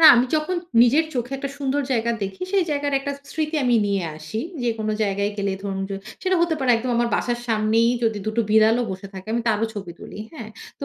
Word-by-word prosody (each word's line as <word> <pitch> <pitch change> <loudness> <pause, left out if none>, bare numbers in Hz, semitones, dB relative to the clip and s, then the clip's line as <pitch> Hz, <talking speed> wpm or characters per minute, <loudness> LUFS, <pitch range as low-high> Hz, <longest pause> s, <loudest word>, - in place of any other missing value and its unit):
না - - +7
আমি 245 +1 +4
যখন 310 +4 0 0.3
নিজের 280 +7 +5
চোখে 245 +2 -2
একটা 275 0 -4
সুন্দর 280 0 0
জায়গা 235 -1 +1
দেখি 195 - -4
সেই 385 -3 +3
জায়গার 285 -1 0
একটা 280 +1 -3 0.2
স্মৃতি 310 0 -1
আমি 245 -1 +3
নিয়ে 200 -2 0
আসি। 155 +8 -6 0.2
যে 240 - +1
কোনো 215 0 -1
জায়গায় 200 0 0
গেলে 200 -1 0
ধরুন 195 -1 -3
যে, - - -2 0.3
সেটা 375 0 +2
হতে 340 -2 +2
পারে 265 -3 +2
একদম 245 +2 -2
আমার 235 0 +2
বাসার 240 -1 0
সামনেই 225 +1 +3 0.2
যদি 220 -2 +1
২ 215 - +1
টো 230 - +4
বিড়ালও 220 +2 +5
বসে 190 +1 -6
থাকে 190 +1 -8
আমি 235 - 0
তারও 220 +1 +2
ছবি 195 -4 -6
তুলি। - - -10
হ্যাঁ? 230 -8 -8 0.3
তো - - -3
230 Hz, 225 wpm, -23 LUFS, 205-275 Hz, 0.3 s, না